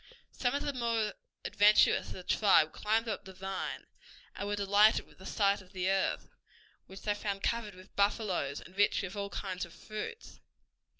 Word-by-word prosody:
Some 245 +1 -1
of 285 - -1
the 285 - -2
more 230 -4 0 0.3
adventurous 210 +1 +5
of - - -7
the 185 - -9
tribe 185 -5 +4
climbed 225 +2 0
up 220 - -3
the 190 -1 -11
vine, 190 +1 -4 0.5
and 200 - -4
were 205 - 0
delighted 205 +2 +4
with - - -22
the 190 - -9
sight 200 -1 +2
of 185 +1 -19
the 185 0 0
earth, 195 -1 0 0.6
which 190 0 -11
they 210 - +1
found 200 -1 -4
covered 225 -4 -1
with 185 0 -16
buffaloes 200 - 0
and 185 - -14
rich 205 0 +3
with 195 +1 -5
all 200 -1 -3
kinds 185 -2 -4
of 170 - -8
fruits. 220 - -7
200 Hz, 185 wpm, -32 LUFS, 190-215 Hz, 0.6 s, adventurous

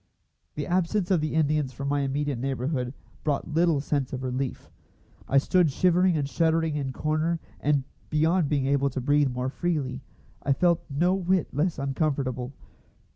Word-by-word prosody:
The 145 - -3
absence 185 +2 0
of 175 -4 +3
the 155 0 -2
Indians 150 -3 +1
from 140 +4 -5
my 145 0 +1
immediate 140 -1 -1
neighbourhood 130 0 -2 0.3
brought 150 +1 -1
little 165 -2 +3
sense 140 -2 -1
of 130 0 -4
relief. 130 +1 -3 0.6
I 140 - +3
stood 175 +4 +4
shivering 180 +3 +3
and 145 -2 -1
shuddering 160 0 +1
in 140 -2 -2
my - - -3
corner, 155 +3 0 0.2
and, 145 -2 +2 0.3
beyond 160 +1 +2
being 140 -3 +1
able 140 0 +2
to 135 - -4
breathe 145 +2 +3
more 125 +1 -2
freely, 140 -7 -2 0.4
I 140 - +2
felt 170 +4 +2
no 170 +6 +2
whit 185 -2 0
less 155 +5 0
uncomfortable. 135 -3 -1
145 Hz, 165 wpm, -26 LUFS, 135-165 Hz, 0.6 s, stood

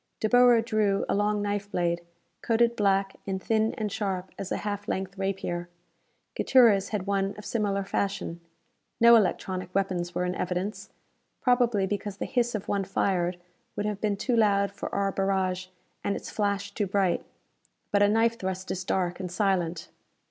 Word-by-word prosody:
De 215 - +1
Boer 245 0 +6
drew 215 -4 +1
a - - 0
long 205 0 +1
knife 205 0 -2
blade, 170 -2 0 0.4
coated 235 +1 +2
black, 195 -2 +1
and 190 -1 -1
thin 220 +2 +1
and 215 -2 -3
sharp 190 -4 -3
as 195 - -6
a - - 0
half 205 -1 -3
length 190 0 -3
rapier. 190 -3 -3 0.7
Gutierrez 225 -7 +5
had 205 -4 -2
one 195 0 0
of 210 - -10
similar 200 -3 0
fashion. 195 -3 -2 0.6
No 235 0 +8
electronic 185 -3 0
weapons 180 -3 -1
were 180 - 0
in 180 - -1
evidence, 180 +4 -3 0.5
probably 245 -5 +3
because 205 0 -3
the - - -3
hiss 240 -3 0
of 205 - -4
one 200 -1 0
fired 185 -2 0 0.4
would 205 - -2
have 210 -1 -3
been 210 -2 0
too 245 +4 0
loud 200 -3 +3
for 200 - -6
our 200 0 0
barrage, 190 -1 0 0.4
and 200 - 0
its - - -7
flash 200 -1 -1
too 205 0 -2
bright. 190 -2 +1 0.7
But 205 - +3
a 205 - +6
knife 225 +2 +2
thrust 190 0 -4
is 185 - -3
dark 180 -1 -1
and 180 -2 -5
silent! 180 -3 0
200 Hz, 170 wpm, -27 LUFS, 190-210 Hz, 0.7 s, No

